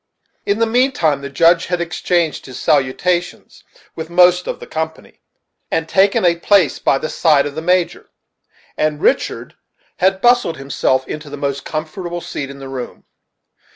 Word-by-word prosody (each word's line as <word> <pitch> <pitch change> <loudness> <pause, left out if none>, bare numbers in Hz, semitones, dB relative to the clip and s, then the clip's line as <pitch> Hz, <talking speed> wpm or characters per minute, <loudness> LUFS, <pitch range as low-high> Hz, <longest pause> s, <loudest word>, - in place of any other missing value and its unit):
In 200 - +1
the 230 - +2
mean 250 +4 +2
time 155 - +1
the 140 - -6
Judge 165 +5 +3
had 180 -1 -1
exchanged 170 -3 -1
his 130 -1 -8
salutations 165 +5 -1 0.3
with 160 0 -6
most 180 +1 +4
of - - -4
the - - -9
company, 160 0 -6 0.5
and 165 0 -1
taken 195 +1 +3
a 170 -1 +3
place 180 -2 +3
by 135 - +2
the 155 - -4
side 155 -3 +3
of 145 - -4
the 160 - -5
Major, 180 +1 0 0.7
and 155 -1 -1
Richard - - -1 0.4
had 190 +1 +2
bustled 245 -7 +3
himself 130 -1 -1
into 150 -1 -7
the 145 - -7
most 140 -1 -3
comfortable 170 +3 -5
seat 140 -4 -6
in 140 - -9
the 135 -1 -9
room. 130 -2 -7
165 Hz, 165 wpm, -18 LUFS, 145-180 Hz, 0.7 s, most